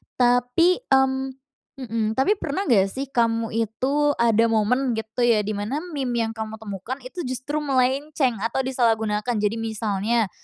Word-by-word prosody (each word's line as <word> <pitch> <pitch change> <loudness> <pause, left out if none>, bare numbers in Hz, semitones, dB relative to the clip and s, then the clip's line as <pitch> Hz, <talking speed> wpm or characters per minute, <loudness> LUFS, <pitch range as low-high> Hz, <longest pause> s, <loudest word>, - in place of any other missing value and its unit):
Tapi, 245 +8 +3
mmm, 265 0 +2 0.5
mhm, 230 -2 -2
tapi 385 +11 +2
pernah 310 +7 -2
gak 200 -6 +5
sih 265 +6 -5
kamu 230 -2 +1
itu 260 +7 0
ada 230 -1 +3
momen 235 +3 +1
gitu 220 +2 -1
ya 230 -3 +4
di 215 - -3
mana 245 +9 -2
meme 265 -5 -2
yang 225 0 -1
kamu 220 0 -5
temukan 205 +4 -5
itu 305 +7 -6
justru 260 +4 -3
melenceng 270 -2 +1
atau 235 +3 0
disalahgunakan? 225 -3 0
Jadi 210 +2 0
misalnya, 220 -1 -1
240 Hz, 150 wpm, -23 LUFS, 220-265 Hz, 0.5 s, gak